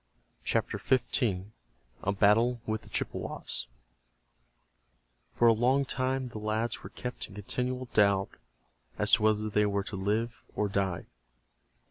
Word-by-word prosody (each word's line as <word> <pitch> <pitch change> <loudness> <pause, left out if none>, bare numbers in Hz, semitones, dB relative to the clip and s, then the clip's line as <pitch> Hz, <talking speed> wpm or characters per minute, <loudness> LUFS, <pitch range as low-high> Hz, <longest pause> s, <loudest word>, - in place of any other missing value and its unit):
CHAPTER - - 0
XV—A 100 - -1
BATTLE 115 +5 +4
WITH 110 0 -1
THE - - -15
CHIPPEWAS - - -3 1.6
For 120 - +3
a 115 - +7
long 130 +5 +3
time 130 0 -1
the 110 - -7
lads 110 +2 -1
were - - -8
kept 125 0 -5
in 100 - -14
continual 125 +5 -2
doubt 100 -2 +3 0.7
as - - +2
to - - +7
whether 110 0 +2
they 105 0 +2
were 100 -1 0
to 100 - -6
live 105 +5 -1
or 105 - +1
die. 95 -3 -1
110 Hz, 130 wpm, -30 LUFS, 100-120 Hz, 1.6 s, a